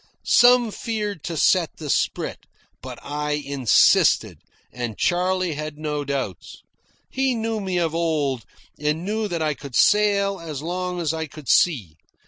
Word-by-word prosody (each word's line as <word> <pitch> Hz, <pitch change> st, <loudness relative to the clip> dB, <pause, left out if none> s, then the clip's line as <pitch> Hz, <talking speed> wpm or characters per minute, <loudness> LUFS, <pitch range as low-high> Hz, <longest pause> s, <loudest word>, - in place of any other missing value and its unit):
Some 245 Hz, -2 st, +5 dB
feared 210 Hz, -, -4 dB
to 165 Hz, -2 st, -4 dB
set 175 Hz, +1 st, +2 dB
the 155 Hz, -, -7 dB
sprit; -, -, -2 dB, 0.3 s
but -, -, -8 dB
I 150 Hz, +1 st, -3 dB
insisted, 140 Hz, -5 st, +3 dB, 0.3 s
and 120 Hz, -4 st, -5 dB
Charley 180 Hz, -1 st, 0 dB
had 155 Hz, 0 st, -6 dB
no 150 Hz, -1 st, -3 dB
doubts. 135 Hz, -10 st, -5 dB, 0.5 s
He 265 Hz, -1 st, 0 dB
knew 225 Hz, -1 st, -2 dB
me 190 Hz, -3 st, -2 dB
of 165 Hz, -2 st, 0 dB
old, 150 Hz, -7 st, -1 dB, 0.4 s
and 150 Hz, +3 st, -1 dB
knew 215 Hz, +1 st, -1 dB
that 170 Hz, -4 st, -2 dB
I 155 Hz, -1 st, +1 dB
could 140 Hz, -2 st, -10 dB
sail 200 Hz, -1 st, +3 dB
as 155 Hz, -4 st, -7 dB
long 180 Hz, +1 st, -3 dB
as 165 Hz, -2 st, -1 dB
I 160 Hz, 0 st, -3 dB
could 150 Hz, -1 st, -13 dB
see. 110 Hz, -, +2 dB
160 Hz, 150 wpm, -23 LUFS, 145-195 Hz, 0.5 s, Some